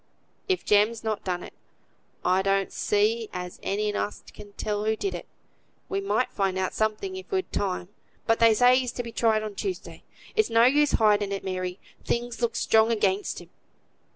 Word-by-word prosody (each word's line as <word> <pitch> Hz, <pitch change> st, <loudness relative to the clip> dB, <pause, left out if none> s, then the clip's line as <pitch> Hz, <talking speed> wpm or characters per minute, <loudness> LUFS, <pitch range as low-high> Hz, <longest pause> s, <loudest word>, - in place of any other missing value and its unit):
"If 375 Hz, -, 0 dB
Jem's 210 Hz, +2 st, +3 dB
not 220 Hz, -1 st, -2 dB
done 180 Hz, -1 st, -2 dB
it, -, -, -10 dB, 0.7 s
I 185 Hz, +1 st, +3 dB
don't 195 Hz, 0 st, +1 dB
see 215 Hz, +2 st, +1 dB
as 180 Hz, -1 st, -6 dB
any 210 Hz, +1 st, -1 dB
on -, -, 0 dB
us -, -, -5 dB
can 205 Hz, -1 st, -12 dB
tell 210 Hz, 0 st, -2 dB
who 220 Hz, 0 st, +2 dB
did. 390 Hz, -, -4 dB, 0.6 s
We 395 Hz, 0 st, -1 dB
might 390 Hz, -10 st, 0 dB
find 195 Hz, -2 st, 0 dB
out 185 Hz, 0 st, -1 dB
something 220 Hz, -, -1 dB
if 375 Hz, -, -9 dB
we'd 375 Hz, -1 st, -2 dB
time; 185 Hz, -3 st, -1 dB, 0.4 s
but 225 Hz, -, +2 dB
they 230 Hz, -1 st, +6 dB
say 250 Hz, +3 st, +6 dB
he's 250 Hz, -2 st, -2 dB
to 245 Hz, -, -3 dB
be 230 Hz, -, -7 dB
tried 220 Hz, -1 st, +2 dB
on 215 Hz, -1 st, -5 dB
Tuesday. 370 Hz, -, -5 dB, 0.3 s
It's 435 Hz, -1 st, +3 dB
no 230 Hz, 0 st, +5 dB
use 290 Hz, +4 st, +4 dB
hiding 210 Hz, -2 st, +3 dB
it, 195 Hz, -, -3 dB
Mary; 185 Hz, -1 st, -3 dB, 0.3 s
things 240 Hz, 0 st, -2 dB
looks 235 Hz, -1 st, 0 dB
strong 220 Hz, +1 st, +4 dB
against 205 Hz, -3 st, 0 dB
him." -, -, -16 dB
215 Hz, 185 wpm, -26 LUFS, 200-240 Hz, 0.7 s, they